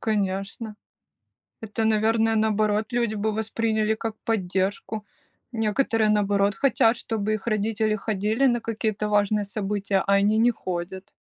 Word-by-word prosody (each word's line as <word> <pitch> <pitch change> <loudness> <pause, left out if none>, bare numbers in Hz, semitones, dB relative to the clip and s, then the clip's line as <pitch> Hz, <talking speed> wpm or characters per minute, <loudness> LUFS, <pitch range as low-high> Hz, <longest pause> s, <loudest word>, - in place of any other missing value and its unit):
Конечно, 205 +1 -2 0.9
это, 220 +1 -2
наверное, 220 +1 +2
наоборот 215 0 +1
люди 235 -3 0
бы 215 +1 -1
восприняли 220 0 0
как 220 0 -4
поддержку. 200 +1 -1 0.5
Некоторые 225 -1 +1
наоборот 200 -1 +2
хотят, 240 -2 +3
чтобы 215 -1 -2
их 215 - -9
родители 215 0 0
ходили 215 +5 0
на 240 -2 +2
какие-то 215 -2 -2
важные 205 0 +2
события, 200 -1 -1
а 200 - +1
они 205 +2 +3
не 240 +2 +4
ходят. 185 -2 -6
215 Hz, 130 wpm, -25 LUFS, 200-225 Hz, 0.9 s, не